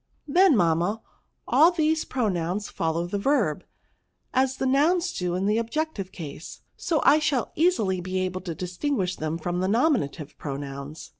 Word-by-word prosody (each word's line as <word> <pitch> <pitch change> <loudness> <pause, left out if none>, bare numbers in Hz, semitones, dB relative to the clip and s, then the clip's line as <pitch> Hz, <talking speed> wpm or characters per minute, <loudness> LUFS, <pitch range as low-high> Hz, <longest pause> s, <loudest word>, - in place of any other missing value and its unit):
Then, 345 - +5
mamma, 175 +4 +1 0.5
all 325 - +6
these 320 -2 +1
pro 250 -4 -1
nouns 180 +2 -2
follow 165 +1 -1
the 200 +3 -3
verb, 220 - +1 0.7
as 265 0 +1
the - - -2
nouns 330 +7 +2
do 180 -1 -2
in 185 +2 -1
the 210 +2 +2
objective 230 -4 -3
case; 155 -2 -9
so 320 -3 0
I 295 +2 +6
shall 285 -5 0
easily 220 - +2
be 185 +1 -3
able 185 0 -3
to 170 -3 -5
distinguish 185 - -2
them 155 +1 -2
from 175 +2 -3
the 185 - 0
nominative 215 - 0
pronouns." 140 +1 -6
195 Hz, 160 wpm, -25 LUFS, 170-280 Hz, 0.7 s, all